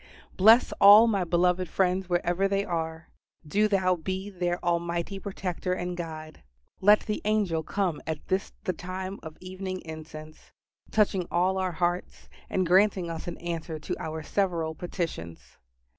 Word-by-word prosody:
Bless 220 +6 +6
all 205 +3 +10
my 205 -5 +1
beloved 180 +1 +1
friends 185 -1 0
wherever 175 +2 +1
they 200 0 0
are; 160 -1 -4 0.4
do 210 +7 +2
Thou 185 -3 +2
be 190 +4 -4
their 175 -2 -1
Almighty 170 +2 -1
Protector 185 -2 -3
and 180 -1 -3
Guide. 155 -2 -7 0.4
Let 205 +2 +6
the 210 -1 -3
angel 205 -6 +1
come 180 -1 -2
at 155 -1 -4
this 190 +1 -1
the 185 - -1
time 185 +3 -6
of 160 -1 -10
evening 185 0 -5
incense, 155 -1 -10 0.4
touching 195 -4 +1
all 185 +2 +1
our 185 -1 -1
hearts, 175 +1 -2 0.2
and 185 - 0
granting 185 -1 +3
us 165 +1 -6
an 175 - -5
answer 165 -2 -4
to 150 - -4
our 160 0 -5
several 170 -4 -1
petitions. 160 - -6
180 Hz, 150 wpm, -27 LUFS, 165-190 Hz, 0.4 s, all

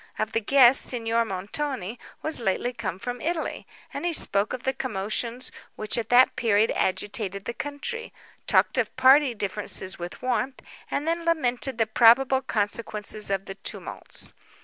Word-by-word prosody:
Of 215 0 -2
the 225 - 0
guests, 260 +2 +6
Signor 230 -1 0
Montoni 220 +3 -4 0.2
was 315 - +2
lately 235 +3 -1
come 205 -7 -4
from 245 +4 -5
Italy, 330 0 -3 0.3
and - - -5
he 350 -1 0
spoke 200 -8 +2
of 255 - -5
the 265 - 0
commotions 235 +1 -2 0.2
which 215 - -1
at 230 -2 -2
that 245 +1 +5
period 220 -2 +2
agitated 200 0 -2
the 235 - -3
country; 380 - -5 0.4
talked - - +3
of - - -1
party 260 0 +5
differences 200 -2 -1
with 175 +7 -8
warmth, 255 +1 -1 0.3
and 295 - -2
then 335 +1 0
lamented 270 -6 0
the 225 - +2
probable 245 +4 +5
consequences 210 -2 -3
of 195 0 -1
the 195 - -6
tumults. 195 - -2
235 Hz, 155 wpm, -25 LUFS, 210-265 Hz, 0.4 s, guests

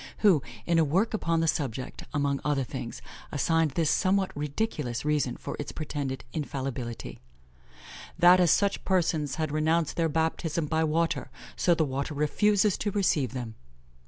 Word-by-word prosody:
who, 180 -8 +6 0.2
in 170 -1 +3
a - - +5
work 185 +11 +1
upon 165 -6 +1
the 165 - +1
subject, 130 -4 -3
among 140 -2 0
other 145 -2 +1
things, - - -6 0.3
assigned 165 +2 +2
this 165 -3 +2
somewhat 190 0 +1
ridiculous 145 - -2
reason 150 -4 0
for - - -6
its 145 - -4
pretended 140 -5 -4
infallibility: 130 -6 -4 1.0
"That 175 +1 +7
as 175 -2 +4
such 200 +5 +2
persons 165 -6 +1
had 155 -2 -2
renounced 155 +1 +1
their 165 -1 +2
baptism 160 0 -1
by 160 +2 +1
water, 165 +2 0 0.3
so 175 - +3
the 160 - +2
water 140 +2 -3
refuses 200 +7 +2
to 205 - -1
receive 170 - +1
them." 120 -4 -5
155 Hz, 155 wpm, -28 LUFS, 140-170 Hz, 1.0 s, That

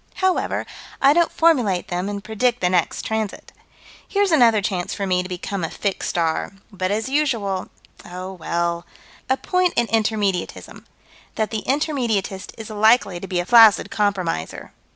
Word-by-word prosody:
However, 375 -1 0 0.3
I 275 +1 +5
don't 340 +1 +2
formulate 245 - +2
them 180 +2 -2
and 200 -1 -5
predict 240 +3 0
the 180 0 +1
next 180 -2 0
transit. 220 -2 -3 0.6
Here's 400 -2 +1
another 235 -8 +5
chance 190 -3 -2
for 200 - -3
me 180 -1 +1
to 180 - -8
become 185 +1 -4
a 165 - -2
fixed 200 -2 -3
star 165 +2 -1 0.2
but 185 -2 -2
as 215 +4 -1
usual 230 -10 -1 0.4
oh, 185 +2 -7
well 170 -1 -2 0.4
A 260 - +2
point 365 +2 0
in 235 - +2
Intermediatism: 215 -4 -2 0.5
That 220 -1 -1
the 220 -2 -2
Intermediatist 240 -10 -1
is 220 -1 -8
likely 215 -3 +3
to 195 - -7
be 180 -2 -1
a 175 - -2
flaccid 225 -1 +6
compromiser. 185 - -2
205 Hz, 155 wpm, -21 LUFS, 185-240 Hz, 0.6 s, flaccid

